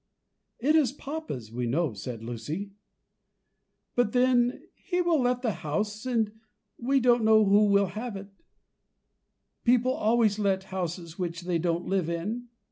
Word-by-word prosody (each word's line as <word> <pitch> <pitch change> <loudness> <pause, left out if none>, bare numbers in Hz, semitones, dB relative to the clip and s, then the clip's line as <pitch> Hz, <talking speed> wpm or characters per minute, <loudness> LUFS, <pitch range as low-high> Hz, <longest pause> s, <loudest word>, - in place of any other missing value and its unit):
"It 295 +6 +2
is 290 -7 +4
papa's, 280 - -6
we 120 +1 -2
know," 145 +2 0
said 110 +3 -7
Lucy; 135 - -5 1.2
"but 245 -3 +2
then 245 -1 +3
he 360 -1 -3
will 340 -5 +2
let 250 0 0
the 230 - +1
house, 205 - -3
and 225 -4 +1 0.5
we 270 +3 +2
don't 240 -2 +3
know 220 -1 +6
who 205 +2 +5
will 200 -1 +4
have 220 +1 -5
it; 195 +1 -8 1.3
people 250 +1 +3
always 220 -2 +2
let 195 -2 +1
houses 175 -2 -4
which 170 -1 -3
they 175 -1 -1
don't 170 +1 -1
live 185 -4 0
in. 210 +9 -3
210 Hz, 145 wpm, -28 LUFS, 170-245 Hz, 1.3 s, know